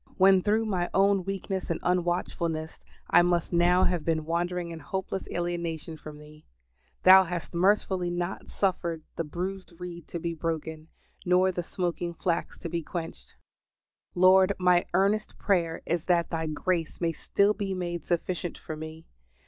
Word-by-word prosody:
When 190 0 +6
through 215 +3 +1
my 180 -5 -1
own 195 -1 +3
weakness 195 -1 -3
and 170 - -1
unwatchfulness 175 -2 -1 0.3
I 175 - +7
must 175 -1 +1
now 175 +2 +4
have 175 -3 +1
been 160 -2 0
wandering 175 +1 -1
in 165 - -7
hopeless 190 +4 -4
alienation 170 -2 -3
from 155 -1 -10
Thee, 150 +1 -15 0.6
Thou 190 0 +9
hast 170 -3 -5
mercifully 185 0 +2
not 175 +1 -4
suffered 170 -4 -1
the 165 - -1
bruised 185 +4 -5
reed 175 -2 -8
to - - -5
be 170 0 -3
broken, 160 -1 -4 0.4
nor 180 +1 +3
the 180 - -3
smoking 175 0 -3
flax 170 0 -2
to - - -6
be 170 0 -2
quenched. 160 - -7 0.8
Lord, 185 +2 +6
my 180 -1 +3
earnest 200 +3 +1
prayer 170 -5 0
is 170 -1 -1
that 175 -2 +2
Thy 160 -1 -2
grace 165 +1 -2
may 170 -1 +1
still 200 +5 +2
be 195 -2 -3
made 175 -3 -3
sufficient 175 0 -2
for 155 - -7
me. 160 +1 -8
175 Hz, 155 wpm, -28 LUFS, 165-185 Hz, 0.8 s, Thou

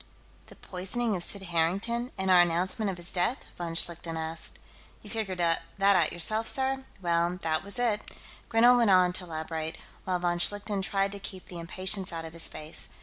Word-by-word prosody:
"The - - -14
poisoning 200 +5 -3
of 175 - +1
Sid 200 +1 0
Harrington, 195 +8 0
and 190 0 0
our 180 -1 +8
announcement 180 +5 +1
of 185 - -4
his 175 +1 -5
death?" 185 +8 0
von 170 -1 -5
Schlichten 165 -1 +2
asked. 160 0 -5 0.5
"You - - -9
figured 215 -5 -2
that 170 -1 +2 0.2
out 195 -5 +4
yourself, 215 +6 +2
sir? 265 0 +2 0.2
Well, 170 +1 +1
that 160 +1 0
was 200 +4 -1
it." 230 -4 +1 0.5
Grinell 240 +2 +6
went 235 -3 +3
on 180 -2 +5
to 180 - -1
elaborate, 160 -1 -5 0.3
while 185 -1 0
von 175 0 -1
Schlichten 205 +2 +2
tried 195 0 0
to 200 - -7
keep 190 -1 -7
the 175 - -9
impatience 185 +3 -1
out 165 -1 -5
of 160 - -9
his 170 - +2
face. 155 +1 -3
185 Hz, 190 wpm, -28 LUFS, 170-205 Hz, 0.5 s, our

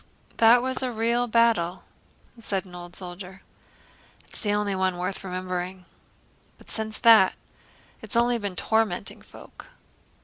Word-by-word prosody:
"That 235 +2 +6
was 260 0 -2
a 255 -1 -1
real 235 +2 +1
battle," 225 -7 +2 0.6
said 200 -4 -3
an 180 - -15
old 175 0 -10
soldier. 185 +1 -9 0.8
"It's - - -11
the 205 - 0
only 205 -1 0
one 185 -1 0
worth 185 +2 -4
remembering; 185 0 -4 0.7
but - - -16
since 220 -1 -1
that... 225 -5 +6 0.7
it's - - -5
only 235 0 +2
been 200 -3 -4
tormenting 220 +2 -1
folk." - - -14
205 Hz, 135 wpm, -25 LUFS, 185-230 Hz, 0.8 s, That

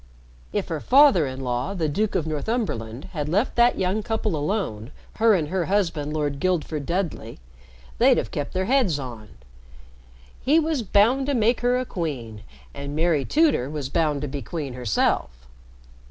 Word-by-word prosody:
"If - - -2
her 160 - -2
father 255 - +5
in 130 0 -6
law, 125 +9 -2
the 165 -4 0
Duke 205 +8 -1
of 160 - 0
Northumberland, 150 - -3
had 150 -3 -3
left 205 - 0
that 240 +1 +4
young 190 +3 0
couple 220 -4 -2
alone 145 - -2 0.3
her 225 -1 +5
and 155 -5 -1
her 185 -1 -1
husband, 165 -7 0
Lord 145 -2 -2
Guildford 155 -4 -1
Dudley 170 - -3 0.6
they'd - - +5
have - - -2
kept 145 -1 -4
their 185 0 0
heads 240 - +2
on. 120 -6 -8 1.1
He 300 +5 +4
was 315 -4 0
bound 230 +6 +3
to 285 - +1
make 230 +1 +2
her 245 +1 +2
a 255 - -2
queen, 130 - -5 0.3
and 140 +1 -6
Mary 160 -3 +2
Tudor 295 - +2
was 145 -3 -4
bound 150 -2 0
to - - -2
be 140 0 -5
queen 140 +2 -5
herself. 120 - 0
165 Hz, 170 wpm, -24 LUFS, 140-215 Hz, 1.1 s, father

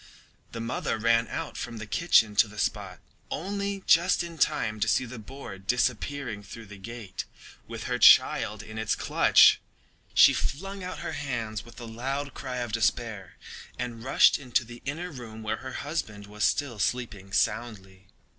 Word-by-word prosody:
The 115 - -6
mother 115 0 -2
ran 115 +1 +2
out - - -5
from 115 - -5
the 110 - -6
kitchen 110 -4 +3
to 110 - +6
the 105 +1 -13
spot, - - -2 0.3
only 200 +3 -3
just 175 +1 +4
in 170 -2 -9
time 110 -5 +1
to 105 - +1
see 120 +4 +2
the 120 0 -8
boar 110 -3 -9
disappearing 125 +2 -1
through 110 +3 -10
the 105 -1 -12
gate 110 -2 -7 0.4
with - - -7
her - - -2
child 105 +1 +5
in 110 +1 -8
its 110 -1 0
clutch. - - +5 0.5
She - - +8
flung 195 +6 -4
out 180 -4 -6
her - - -3
hands 120 -7 -4
with 120 - -14
a 120 - -7
loud 135 +5 -4
cry 130 -2 -5
of 120 -2 -3
despair 110 -3 -1 0.4
and 120 -2 -5
rushed 135 - +5
into 130 -3 0
the 120 +1 -11
inner 165 +6 -4
room 115 -5 -9
where 110 +1 -2
her 130 +3 -8
husband 110 -9 -4
was 105 +1 -5
still 120 -1 0
sleeping 105 -4 -2
soundly. 100 -3 -2
115 Hz, 170 wpm, -27 LUFS, 105-135 Hz, 0.5 s, She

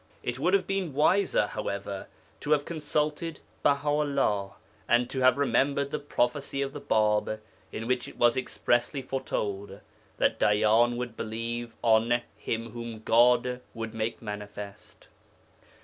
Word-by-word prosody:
It 120 +1 -3
would 180 +7 +3
have 190 -2 +1
been 195 -6 -2
wiser, 180 - +3
however, 100 -2 -4 0.3
to 150 - -4
have 145 -1 +1
consulted 155 0 -2 0.2
Baha 140 +1 +2
'ullah, 140 -10 +1 0.3
and 120 +1 +3
to 135 - -2
have 130 0 +5
remembered 140 0 +1
the 150 - -1
prophecy 140 0 -1
of 135 0 -5
the 145 - -7
Bāb, 110 -4 +1 0.3
in 115 - -5
which 125 0 0
it - - -12
was 120 -1 +4
expressly 130 +1 0
foretold 100 -7 -3 0.4
that - - +2
Dayyan 110 +3 +4
would 120 -2 -4
believe 115 +2 -4
on 115 +1 +3
'Him 115 0 -4
whom 115 -1 -7
God 125 +2 +4
would 115 0 -5
make 115 +1 -3
manifest.' 105 0 -8
120 Hz, 140 wpm, -28 LUFS, 110-140 Hz, 0.4 s, have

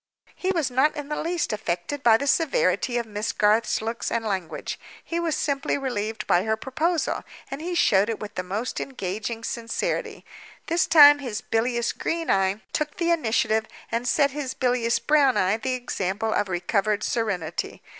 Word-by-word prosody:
He 375 - -3
was 330 -8 0
not 275 +5 +3
in 295 -1 -6
the 300 - -2
least 335 -6 -1
affected 215 +7 -3
by 225 -4 +6
the 280 - -3
severity 325 - +1
of 235 - -1
Miss 215 +1 -3
Garth's 215 +1 +2
looks 230 +1 -3
and 230 -1 -1
language—he 195 - -4
was 335 -2 -1
simply 280 -2 0
relieved 225 -5 -3
by 175 - +3
her 220 +1 0
proposal, 315 +7 -1 0.3
and 275 +2 -5
he 350 +2 -3
showed 205 - +3
it 225 - -2
with 210 -1 -7
the 185 - -2
most 200 +7 -3
engaging 220 -1 -4
sincerity. 230 0 -3 0.4
This 330 -1 +1
time 290 -2 +8
his 240 -7 -4
bilious 235 +1 0
green 330 0 -2
eye 195 +2 +1
took 300 -1 -2
the 340 -1 +1
initiative, 220 -7 +1 0.2
and 235 +2 -1
set 280 +2 +3
his 280 -2 -4
bilious 245 -2 +1
brown 290 -4 +3
eye 190 +3 +2
the 255 +3 -2
example 220 -3 -2
of 205 - 0
recovered 200 +4 0
serenity. 215 -8 -2
235 Hz, 170 wpm, -25 LUFS, 215-290 Hz, 0.4 s, time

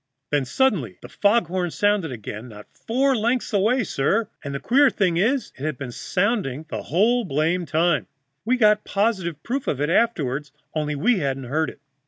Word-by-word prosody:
"Then 145 -2 +1
suddenly 145 - 0
the - - -9
fog 205 0 +2
horn 175 +1 -2
sounded 205 -3 +1
again, 110 0 -7
not 105 -1 -11
four 265 +4 +1
lengths 235 +1 0
away, 220 +6 +2
sir, 200 +7 0
and 140 - -5
the - - -2
queer 275 - +4
thing 185 -7 +1
is 245 +8 +1
it 135 - -9
had 155 -4 -2
been 135 -3 -6
sounding 180 - -1
the - - -4
whole 230 +9 +2
blamed 165 +1 0
time 170 +1 +1 0.4
we 255 +3 +1
got 210 -2 +4
positive 190 -7 -1
proof 260 +3 -3
of 135 - -1
it 150 +3 0
afterward 150 - +1 0.2
only 150 -1 -1
we 215 - +2
hadn't 135 -3 -2
heard 150 +5 -1
it. - - -13
180 Hz, 185 wpm, -23 LUFS, 145-225 Hz, 0.4 s, queer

